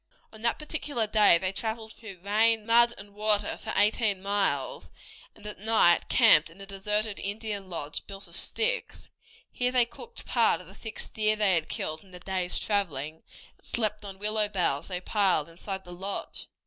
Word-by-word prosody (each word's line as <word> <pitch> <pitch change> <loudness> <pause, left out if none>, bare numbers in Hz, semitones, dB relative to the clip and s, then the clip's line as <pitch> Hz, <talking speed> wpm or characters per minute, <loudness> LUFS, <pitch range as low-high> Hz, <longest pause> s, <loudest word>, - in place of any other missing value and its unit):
On 220 - -13
that 235 0 0
particular 300 -6 -2
day 210 -4 +5
they 185 +2 -2
traveled 220 +2 -5
through 200 -5 -11
rain, 220 +2 +2
mud, 235 +1 +5
and 205 0 -11
water 210 0 +4
for - - -7
eighteen 210 -1 +2
miles, 205 - -1 0.5
and 210 - -16
at 210 -2 -5
night 215 -5 +3
camped 155 - +6
in 165 +4 -17
a 195 - -8
deserted 210 +2 -1
Indian 205 -1 -3
lodge 150 -4 -5
built 195 -1 -8
of 170 - -13
sticks. 460 - -1 0.4
Here 250 0 0
they 250 -2 +5
cooked 465 - -11
part 230 -8 +2
of 180 - -12
the 190 - -14
six 220 +2 -6
deer 215 0 +1
they 210 -3 +3
had 165 -2 0
killed 155 0 -4
in 195 - -20
the 180 -1 -11
day's 185 -1 -2
traveling, 160 -7 -2 0.4
and - - -21
slept 215 -2 -1
on 195 -1 -8
willow 210 +1 0
boughs 175 -8 -1
they 180 -2 -4
piled 190 -6 +1
inside 190 +3 -7
the 175 - -10
lodge. 195 +3 -5
205 Hz, 185 wpm, -28 LUFS, 185-220 Hz, 0.5 s, camped